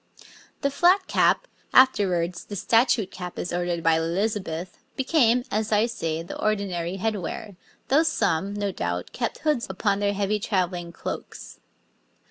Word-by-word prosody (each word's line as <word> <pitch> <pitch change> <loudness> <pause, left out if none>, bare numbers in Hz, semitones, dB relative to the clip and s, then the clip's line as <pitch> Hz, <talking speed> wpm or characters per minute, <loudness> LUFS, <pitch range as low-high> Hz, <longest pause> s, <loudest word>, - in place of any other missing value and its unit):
The 280 -1 +1
flat 360 +7 +4
cap, - - +2 0.3
afterwards 185 -9 +3
the 205 - -7
statute 225 0 +2
cap 180 -1 -7
as 175 - -4
ordered 175 -1 -1
by 160 0 +4
Elizabeth, 180 0 -2 0.2
became, 250 -4 +3
as 215 +1 -1
I 210 +1 +4
say, 165 -9 -3
the 170 - -7
ordinary 195 -4 -1
head 215 +2 -1
wear, 195 +3 -6 0.3
though 280 +4 +5
some, 200 - 0
no 205 -1 -1
doubt, 90 - -3
kept 235 - -3
hoods 300 -6 0
upon 200 +1 0
their 205 0 +1
heavy 205 +1 0
travelling 180 -4 -1
cloaks. - - -7
200 Hz, 145 wpm, -25 LUFS, 175-230 Hz, 0.3 s, though